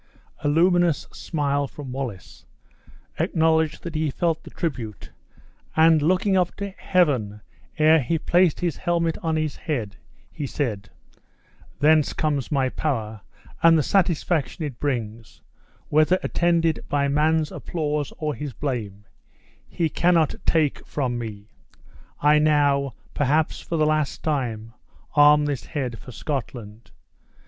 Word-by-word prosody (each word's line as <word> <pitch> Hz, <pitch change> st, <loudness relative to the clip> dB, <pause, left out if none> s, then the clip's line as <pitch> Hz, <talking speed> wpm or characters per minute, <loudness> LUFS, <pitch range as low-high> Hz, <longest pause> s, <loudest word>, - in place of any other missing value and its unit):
A -, -, -2 dB
luminous 175 Hz, +1 st, +3 dB
smile 145 Hz, -3 st, -1 dB
from 135 Hz, -1 st, -9 dB
Wallace 125 Hz, -8 st, -7 dB, 0.7 s
acknowledged 160 Hz, -1 st, +1 dB
that 170 Hz, -, -6 dB
he 155 Hz, -1 st, 0 dB
felt 165 Hz, +2 st, -1 dB
the -, -, -11 dB
tribute 125 Hz, -, -5 dB, 0.6 s
and, 160 Hz, -1 st, +5 dB
looking 185 Hz, +5 st, +2 dB
up 180 Hz, -2 st, +1 dB
to 200 Hz, -1 st, -5 dB
Heaven 135 Hz, -, 0 dB, 0.4 s
ere 155 Hz, 0 st, +5 dB
he 150 Hz, +7 st, 0 dB
placed 175 Hz, +2 st, +2 dB
his 170 Hz, -5 st, -1 dB
helmet 170 Hz, -2 st, 0 dB
on 160 Hz, -1 st, -1 dB
his 155 Hz, -2 st, -1 dB
head, 115 Hz, -, -4 dB, 0.3 s
he 145 Hz, -, -5 dB
said: 110 Hz, -7 st, -3 dB, 0.9 s
"Thence 155 Hz, 0 st, +4 dB
comes 145 Hz, -3 st, -1 dB
my 135 Hz, -3 st, +2 dB
power! 110 Hz, -9 st, -3 dB, 0.4 s
and 165 Hz, 0 st, +6 dB
the 155 Hz, -, +2 dB
satisfaction 170 Hz, -2 st, 0 dB
it 130 Hz, -5 st, -7 dB
brings, 115 Hz, -5 st, -4 dB, 0.5 s
whether 155 Hz, +4 st, +4 dB
attended 170 Hz, -2 st, +1 dB
by 140 Hz, -1 st, +1 dB
man's 155 Hz, +2 st, +1 dB
applause 150 Hz, -3 st, -3 dB
or 150 Hz, -1 st, -2 dB
his 140 Hz, +1 st, -6 dB
blame, 105 Hz, -8 st, -4 dB, 0.6 s
he 165 Hz, -, 0 dB
cannot 165 Hz, -1 st, +2 dB
take 155 Hz, -4 st, +1 dB
from 125 Hz, -4 st, -2 dB
me. 105 Hz, -3 st, -7 dB, 0.7 s
I 150 Hz, +1 st, +4 dB
now, 140 Hz, -4 st, +2 dB, 0.2 s
perhaps 150 Hz, +3 st, +1 dB
for 165 Hz, -, -3 dB
the 155 Hz, -, +3 dB
last 155 Hz, -2 st, 0 dB
time, 115 Hz, -7 st, -2 dB, 0.4 s
arm 150 Hz, 0 st, +6 dB
this 145 Hz, -3 st, -3 dB
head 130 Hz, -7 st, -4 dB
for 130 Hz, -, -11 dB
Scotland. 120 Hz, -5 st, -6 dB
150 Hz, 130 wpm, -24 LUFS, 130-160 Hz, 0.9 s, and